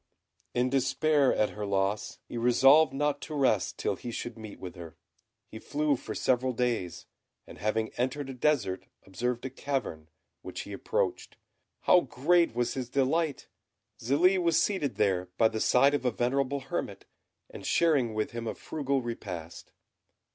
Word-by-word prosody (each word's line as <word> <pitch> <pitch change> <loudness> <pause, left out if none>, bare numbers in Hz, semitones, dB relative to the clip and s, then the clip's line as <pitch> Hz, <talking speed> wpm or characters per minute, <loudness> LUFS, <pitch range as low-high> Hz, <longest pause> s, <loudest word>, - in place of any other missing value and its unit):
In 125 +1 +1
despair 140 +1 +2
at 105 - +1
her 105 - -6
loss, 100 +1 -1
he - - -8
resolved 135 +5 +5
not 145 +1 -1
to 155 - -6
rest 130 -9 +1
till - - -1
he 120 - -7
should 120 0 -5
meet 110 -2 -10
with 90 -2 -7
her. 85 -3 -10 0.5
He 110 - -10
flew 150 +2 0
for - - -7
several 130 0 +1
days, 115 -8 -2 0.4
and - - -13
having 110 +1 0
entered 130 +3 -1
a 135 - -6
desert, 125 -8 0 0.2
observed 120 +6 -3
a 130 - -4
cavern, 125 - -4 0.3
which - - -6
he - - -8
approached. - - -2 0.4
How 180 - +5
great 160 +1 +2
was 120 0 0
his 130 -3 -4
delight! 140 +3 0 0.5
Zélie 175 +10 +3
was 170 -2 +3
seated 170 -10 0
there 95 -3 +1
by 110 -1 +5
the 110 0 -4
side 135 +3 +4
of 145 -3 0
a 125 - +3
venerable 135 +4 0
hermit, - - -5 0.5
and - - -9
sharing 140 -10 +2
with 110 0 -1
him 115 -1 -5
a - - -3
frugal 140 -3 -2
repast. 90 -8 -7
125 Hz, 160 wpm, -29 LUFS, 110-140 Hz, 0.5 s, resolved